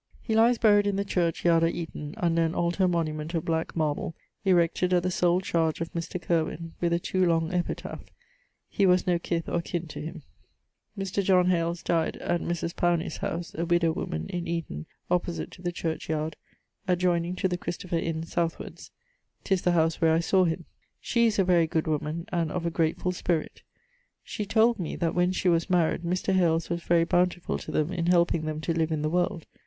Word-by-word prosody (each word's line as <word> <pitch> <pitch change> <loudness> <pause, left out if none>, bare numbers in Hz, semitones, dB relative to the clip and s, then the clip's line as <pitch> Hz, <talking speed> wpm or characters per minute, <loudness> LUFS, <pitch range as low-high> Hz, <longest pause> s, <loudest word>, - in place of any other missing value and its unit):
He 225 - -3
lies 230 +2 +5
buried 205 -2 +4
in 200 - +1
the 200 +1 -1
church 175 -4 -1
yard 165 -1 +5
at 165 - +1
Eaton, 155 -3 -6
under 170 -4 +1
an 165 +1 -1
altar 175 +2 +1
monument 160 -1 -2
of 165 - -1
black 160 0 -1
marble, 155 0 -1 0.3
erected 180 -1 +2
at 175 -1 +3
the 185 - 0
sole 175 +1 +2
chardge 165 -3 0
of 165 0 -4
Mr.... 170 +2 -4
Curwyn, 165 0 -1
with 170 -1 +1
a 170 - +3
too 185 +2 0
long 165 0 +1
epitaph. 175 -1 -3 0.7
He 200 - +2
was 180 0 +4
no 175 -2 +2
kiff 170 -1 -2
or 170 - 0
kin 170 0 -4
to - - -7
him. 160 0 -7 0.7
Mr. 195 0 -1
John 185 -1 +4
Hales 170 0 -1
dyed 165 -2 0
at 175 - -1
Mris 170 0 -2
Powney's 175 0 0
house, 170 0 -4
a 165 - -2
widow 170 -1 +2
woman, 80 - -4
in 175 -1 -3
Eaton, 165 - -4 0.2
opposite 175 -1 -1
to - - -13
the 175 -1 -2
churchyard, 160 -2 -3 0.5
adjoyning 180 -1 +1
to 190 - +1
the 180 - -1
Christopher 175 -1 -3
Inne 165 -1 -2
southwards. 165 0 -3 0.5
'Tis 190 -2 +1
the 180 - +2
howse 165 -1 +1
where 160 -1 +4
I 165 - +3
sawe 185 +2 +3
him. 165 0 -2 0.3
She 235 -1 +2
is 220 - 0
a 195 - +4
very 175 -3 +3
good 160 0 0
woman 155 +2 -2
and 170 -4 -1
of 180 -2 -3
a 170 - 0
gratefull 165 +3 0
spirit. 170 -3 -2 0.6
She 210 - -5
told 225 +1 +3
me 170 - -3
that 165 -1 -1
when 180 +1 +2
she 185 - -1
was 170 -1 +3
maried, 175 -3 +2
Mr. 180 +3 -1
Hales 170 -3 +2
was 170 0 -1
very 170 0 +3
bountifull 175 0 0
to - - -7
them 155 +4 0
in 170 -2 -1
helping 170 -2 +3
them 155 0 -3
to 165 - -1
live 165 -1 0
in 155 -1 -1
the - - +1
world. 175 -2 0
170 Hz, 205 wpm, -27 LUFS, 165-180 Hz, 0.7 s, lies